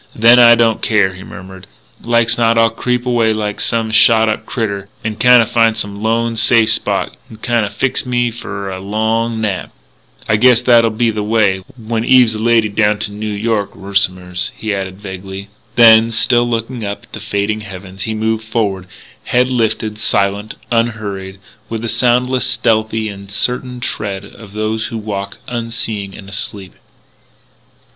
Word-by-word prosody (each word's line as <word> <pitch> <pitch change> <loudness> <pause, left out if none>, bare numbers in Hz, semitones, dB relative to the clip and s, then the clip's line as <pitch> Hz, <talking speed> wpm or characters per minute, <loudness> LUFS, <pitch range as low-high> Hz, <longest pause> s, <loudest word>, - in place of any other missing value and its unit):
"Then 115 +2 +6
I 120 -1 +8
don't 115 -1 +2
care," 100 -4 +2
he 95 - -11
murmured. 95 0 -11 0.3
"Like's 115 0 +2
not 115 -1 +2
I'll 115 -1 +4
creep 125 +2 -2
away 115 -3 +2
like 105 -1 -3
some 115 -1 0
shot 110 0 +5
up 110 0 -3
critter, 100 -4 -3 0.2
n'kinda 115 +2 +4
find 115 0 +2
some 100 -2 -4
lone, 115 +1 0
safe 110 0 +4
spot, - - -1
n'kinda 110 -1 -1
fix 115 +6 -1
me 120 -1 0
f'r 100 -4 -6
a - - -7
long 110 +3 -1
nap.... 105 -4 -2 0.6
I 110 - +2
guess 125 +1 +5
that'll 120 -2 +4
be 115 +1 0
the 105 -1 -3
way... 105 -3 +1 0.2
when 115 -1 -3
Eve's 125 -2 +5
a 110 - -5
lady 115 -1 +3
down 105 0 +1
to 105 0 -3
Noo 105 +1 -5
York 105 0 -2
'r'som'ers 90 -2 -2
" - - -27
he 110 -1 -3
added 95 -1 -5
vaguely. 95 0 -8 0.3
Then, 115 -1 +7
still 120 +1 +1
looking 115 +1 -3
up 100 0 -5
at - - -20
the - - -6
fading 105 +1 -2
heavens, 95 -1 -10
he 110 +2 -3
moved 110 0 -1
forward, 105 -5 -2 0.4
head 125 +1 +1
lifted, 110 -3 -1
silent, 100 0 -1 0.2
unhurried, 105 -5 -2 0.3
with 115 0 -4
the - - -2
soundless, 125 +2 +1
stealthy, 110 -2 0
and 100 -1 -9
certain 125 +4 -1
tread 100 -4 -4
of 100 0 -14
those 110 +1 -2
who 115 - -5
walk 100 -2 -5
unseeing 115 -4 -4
and 95 - -12
asleep. 100 -1 -6
110 Hz, 165 wpm, -16 LUFS, 100-115 Hz, 0.6 s, I